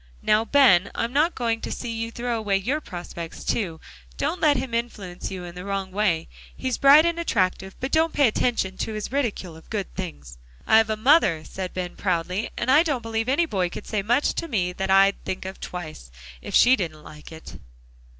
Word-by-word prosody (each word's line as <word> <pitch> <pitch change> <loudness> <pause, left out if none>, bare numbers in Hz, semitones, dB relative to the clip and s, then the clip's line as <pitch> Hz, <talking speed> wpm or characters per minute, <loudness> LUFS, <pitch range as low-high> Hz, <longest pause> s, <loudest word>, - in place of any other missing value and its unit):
Now, 215 +1 +3
Ben, 230 -10 +5
I'm 235 +2 -2
not 310 +5 +2
going 230 -2 -1
to - - -5
see 240 - -4
you 230 0 -3
throw 240 +1 -3
away 205 -3 0
your 260 +11 -1
prospects, 175 - -8
too. 170 -8 -2 0.4
Don't 360 - -2
let 295 -3 +4
him 250 -1 -4
influence 210 -6 -4
you 185 -2 -6
in 175 -1 -8
the 180 +1 -8
wrong 195 -1 -3
way. 185 -5 0 0.3
He's 260 -2 -2
bright 285 +3 +7
and 340 0 0
attractive, 190 - -1
but 265 +1 -4
don't 320 +1 +3
pay 285 -4 +4
attention 215 -4 0
to 220 - -3
his 215 +1 -5
ridicule 225 - -2
of 160 - -16
good 200 -4 -4
things." 70 - -7 0.3
"I've 220 0 +5
a 215 - -1
mother," 215 - +4
said 185 +2 -6
Ben 180 -1 -4
proudly, 180 +2 -1
"and 255 - 0
I 295 +4 +7
don't 290 -8 -1
believe 225 +1 -2
any 300 +6 +3
boy 190 - -1
could 190 - -8
say 210 -2 -1
much 240 +8 +1
to 335 - -4
me, 180 - -1
that 190 +1 -3
I'd 195 +1 +4
think 185 - -5
of 190 +1 -7
twice, 155 - -7 0.3
if - - -5
she 255 +2 +7
didn't 160 -8 -5
like 150 +1 -12
it." 160 0 -10
210 Hz, 210 wpm, -24 LUFS, 180-250 Hz, 0.4 s, bright